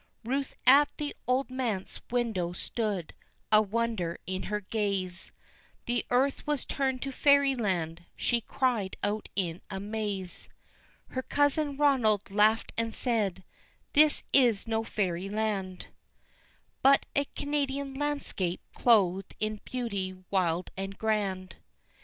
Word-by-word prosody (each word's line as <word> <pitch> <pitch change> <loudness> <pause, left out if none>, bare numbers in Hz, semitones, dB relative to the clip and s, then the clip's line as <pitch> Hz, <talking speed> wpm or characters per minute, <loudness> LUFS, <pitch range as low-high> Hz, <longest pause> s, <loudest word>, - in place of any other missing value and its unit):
Ruth 270 +4 -2
at 280 +3 +7
the 295 -1 -3
old 255 +1 +1
manse 235 -7 -3
window 220 -8 0
stood, 200 -3 -3 0.4
a 215 0 +7
wonder 215 -5 -1
in 185 0 -3
her 210 0 0
gaze, 195 -3 -2 0.5
"The 240 0 0
earth 270 +4 +1
was 295 -3 0
turned 265 -2 -1
to 275 - -3
fairyland" 225 - +2
she 240 -1 0
cried 230 -6 0
out 210 +1 -1
in 175 -3 -1
amaze! 200 -2 -4 0.6
Her 260 - -2
cousin 290 +1 +1
Ronald 240 -9 +3
laughed 215 +2 +3
and 230 -1 -2
said, 210 -7 0 0.5
"This 300 +1 +5
is 240 -7 +4
no 225 -1 0
fairyland, 195 -1 -2 1.0
But 275 +1 +5
a 285 - +2
Canadian 280 -1 -1
landscape 275 -11 -2
clothed 195 -5 +3
in 215 -1 -2
beauty 200 -7 -3 0.2
wild 180 -2 +1
and 195 +1 -5
grand." 200 -4 -1
220 Hz, 115 wpm, -29 LUFS, 190-260 Hz, 1.0 s, at